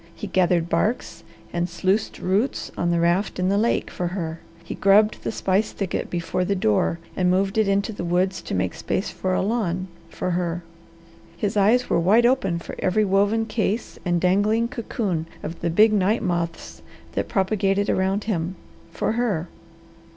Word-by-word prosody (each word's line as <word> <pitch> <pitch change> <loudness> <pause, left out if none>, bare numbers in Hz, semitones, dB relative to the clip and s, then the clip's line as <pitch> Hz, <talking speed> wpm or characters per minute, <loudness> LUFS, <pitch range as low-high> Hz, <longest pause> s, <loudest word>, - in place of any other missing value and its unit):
He - - -6
gathered 180 -3 +2
barks 170 -1 -1 0.3
and 175 +1 -1
sluiced 190 +5 0
roots 200 +8 -1
on 175 - 0
the 170 0 +2
raft 175 +4 +1
in 185 0 +1
the 200 - +2
lake, 230 +2 0
for 180 - -2
her. 170 -3 -4 0.2
He - - -6
grubbed 210 +2 +4
the - - -2
spice 195 0 0
thicket 195 -3 -3
before 175 +1 -1
the 200 +2 0
door 165 - +1 0.2
and 180 -1 +2
moved 195 +3 +1
it 220 -2 +3
into 200 +2 +1
the 200 - -5
woods 180 +2 0
to - - -4
make 95 -1 0
space 190 - -2
for 185 0 -1
a - - +1
lawn, 190 -4 -1 0.2
for 180 - -3
her. 175 -1 -1 0.7
His 205 +1 -1
eyes 220 +5 +3
were - - +2
wide 210 +8 +4
open 245 -9 +2
for 170 - -8
every 210 +3 +2
woven 205 +3 +2
case 220 0 -2
and 175 -1 +1
dangling 205 +6 +2
cocoon 200 -9 -3 0.2
of 165 +2 -6
the 170 - 0
big 215 +6 +5
night 210 +3 +2
moths 170 -3 -3 0.3
that - - -2
propagated 195 0 +1
around 190 +2 +1
him, 185 -4 -2 0.4
for - - -1
her. 210 -8 -1
190 Hz, 175 wpm, -23 LUFS, 175-210 Hz, 0.7 s, big